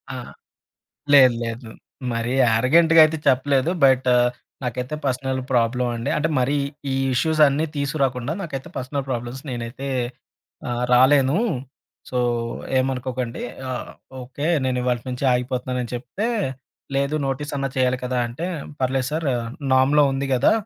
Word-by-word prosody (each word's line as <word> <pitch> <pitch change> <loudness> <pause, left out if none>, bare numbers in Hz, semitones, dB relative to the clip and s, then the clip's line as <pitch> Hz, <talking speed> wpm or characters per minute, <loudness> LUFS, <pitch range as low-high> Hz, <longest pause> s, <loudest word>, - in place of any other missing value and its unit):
ఆ! - - -4 1.0
లేదు, 130 -3 +8
లేదు. 115 0 -5 0.4
మరి 115 +1 -2
యారగెంట్‌గా 160 +9 +5
అయితే 155 0 0
చెప్పలేదు. 135 +3 +2
బట్, 130 -1 +4 0.5
నాకైతే 125 +3 -3
పర్సనల్ 130 0 -1
ప్రాబ్లమ్ 120 +1 +1
అండి. 115 - -3
అంటే, 150 +1 +1
మరి 140 +4 +1 0.4
ఈ - - 0 0.2
ఇష్యూసన్నీ 155 +2 +3
తీసుకురాకుండా, 135 -2 -1
నాకైతే 145 -2 -6
పర్సనల్ 135 +1 -3
ప్రాబ్లమ్స్ 120 +2 -4
నేనైతే 120 +3 -5 0.8
ఆహ్, 120 0 -1
రాలేను 135 +4 +5 0.7
సో, 125 - -1 0.6
ఏమనుకోకండి. 130 -2 -2 0.3
ఆహ్, 125 - -5 0.3
ఓకే, 135 +4 -5 0.2
నేను 130 -1 0
ఇవాల్టి 125 -2 -1
నుంచి 125 +2 -4
ఆగిపోతున్నానని 125 0 -2
చెప్తే, 130 - -3 0.7
లేదు 140 +2 0
నోటీస్ 140 +2 -3
అన్నా 135 0 -1
చేయాలి 130 -1 +2
కదా 125 0 -1
అంటే, 130 +9 -5 0.3
పర్లేదు 130 0 0
సారు 155 -3 -1 0.4
నామ్‌లో 140 +3 +5
ఉంది 135 +1 -2
కదా! 125 +1 +4
130 Hz, 125 wpm, -22 LUFS, 125-140 Hz, 1.0 s, లేదు